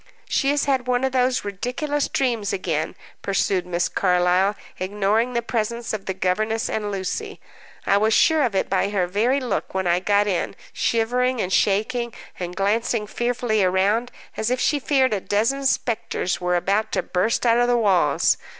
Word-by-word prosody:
"She 275 - +1
has 290 0 +1
had 265 -3 0
one 250 0 +1
of 265 - +1
those 255 -2 +1
ridiculous 250 +9 -2
dreams 235 -6 -1
again," 160 -4 -2 0.3
pursued 195 -2 0
Miss 175 0 0
Carlyle, 180 +2 +2 0.2
ignoring 210 +5 0
the 235 -1 -1
presence 235 0 -2
of 210 -3 -5
the 190 - -2
governess 215 +5 -1
and 210 -1 -2
Lucy. 200 - -4 0.5
"I 200 - +3
was 215 +2 +2
sure 315 +7 +4
of 240 -7 0
it - - +1
by 195 +1 +1
her 195 -3 0
very 220 +9 +1
look 245 -6 -3
when 190 0 0
I 175 0 +2
got 205 +2 +2
in, 190 -4 -1 0.2
shivering 250 +2 0
and 190 -2 -1
shaking, 225 +4 +1 0.2
and 180 0 -5
glancing 215 +2 0
fearfully 240 -1 0
around, 200 +6 +1 0.2
as 220 - -1
if 250 0 0
she 290 - +1
feared 265 -3 +2
a 200 - -1
dozen 255 +9 0
spectres 220 -8 -1
were 180 0 +1
about 200 +5 0
to - - 0
burst 220 +7 0
out 235 0 +4
of 245 - +3
the 245 0 +3
walls. 185 -10 +3
215 Hz, 175 wpm, -22 LUFS, 190-245 Hz, 0.5 s, sure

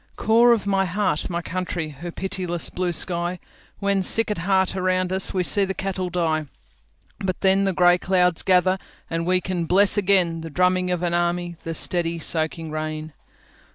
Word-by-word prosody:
Core 235 +2 +4
of 225 -4 +1
my 195 -1 +1
heart, 185 -3 -1
my 170 -1 -3
country! 175 -3 -4
Her 160 +4 -8
pitiless 180 -2 -3
blue 180 -1 -1
sky, 175 +2 0 0.4
When 200 -1 0
sick 225 +4 +2
at 210 - -3
heart, 190 +2 +1
around 185 0 0
us, 190 - +1
We 185 -1 0
see 200 +3 +3
the 190 0 -2
cattle 190 -1 -3
die—But 160 - -5
then 195 0 +3
the 195 - +1
grey 175 0 +4
clouds 180 -2 +1
gather, 185 0 +2 0.3
And 165 +1 -2
we 185 0 +3
can 175 -1 -3
bless 195 +4 +3
againThe 175 -5 +1
drumming 180 +2 +2
of 180 -1 -2
an 170 -1 0
army, 175 0 -1
The 165 0 -4
steady, 170 0 0
soaking 160 0 -2
rain. 155 0 -5
180 Hz, 170 wpm, -23 LUFS, 170-190 Hz, 0.4 s, Core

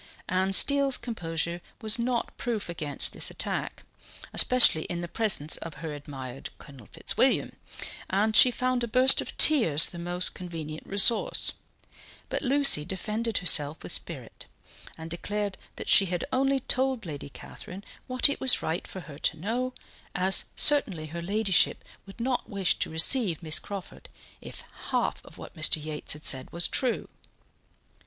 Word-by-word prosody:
Anne 190 +1 -1
Steele's 280 +6 +5
composure 170 -6 -5 0.2
was 220 +1 +2
not 235 0 -3
proof 225 -6 -4
against 155 -4 -1
this - - +1
attack, - - -5 0.5
especially 250 -11 +5
in 175 -1 -5
the 175 - -5
presence 175 -7 +3
of 165 - -9
her 160 -2 -7
admired 135 -3 -9
Colonel 135 -7 -15
Fitzwilliam, - - 0 0.6
and 215 +3 0
she 250 - +7
found 250 0 -2
a - - -3
burst 255 +3 +5
of - - -7
tears 170 - +5
the 175 - -10
most 175 +1 -1
convenient 160 -4 -9
resource, 200 +3 +3 0.8
but - - -3
Lucy 275 - +5
defended 215 +6 -3
herself 155 -4 +4
with - - -6
spirit, - - -6 0.5
and 160 0 -10
declared 205 +3 -4 0.2
that - - -8
she 195 - +6
had 180 -1 -4
only 270 +1 0
told 260 -3 -1
Lady 145 -3 -8
Catherine 185 +7 -10 0.2
what 255 +2 +4
it 285 - -4
was 260 -2 +4
right 165 +3 -4
for 190 - -9
her 150 -4 -13
to - - -2
know, 235 +9 -3 0.4
as 190 +1 +2
certainly 210 - +2
her 170 +3 -8
ladyship 200 +1 0 0.2
would 195 - -14
not 250 +1 -3
wish 195 -3 0
to - - -2
receive 170 - +1
Miss 155 0 +1
Crawford 200 -2 -10 0.3
if - - -10 0.3
half - - -2
of - - -16
what - - -12
Mr. 155 -1 +4
Yates 155 0 -4
had 150 +1 -10
said 130 -1 0
was 170 +1 0
true. 250 -3 -1
190 Hz, 155 wpm, -26 LUFS, 160-235 Hz, 0.8 s, she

